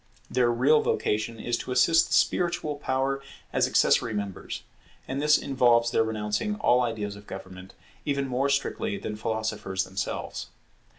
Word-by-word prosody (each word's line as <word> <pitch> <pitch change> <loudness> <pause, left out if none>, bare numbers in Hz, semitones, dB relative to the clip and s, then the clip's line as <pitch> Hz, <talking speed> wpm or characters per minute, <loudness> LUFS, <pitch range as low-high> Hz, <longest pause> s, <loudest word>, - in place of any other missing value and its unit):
Their 125 -2 +3
real 140 +6 +4
vocation 110 +2 -1
is 120 +1 -1
to - - -6
assist 165 +6 +4
the - - -4
spiritual 175 -4 +1
power 135 0 -1 0.3
as - - +3
accessory 115 - +3
members; 100 -2 -5 0.4
and 135 +2 -2
this 150 0 +5
involves 120 -3 +3
their - - +3
renouncing 110 - -2
all 165 - +3
ideas 110 -4 -2
of 100 0 -14
government, 95 0 -9 0.3
even 140 -1 -1
more 130 +2 0
strictly 200 +10 -1
than 105 - -5
philosophers 110 -3 -2
themselves. 95 +2 -4
120 Hz, 145 wpm, -27 LUFS, 105-140 Hz, 0.4 s, this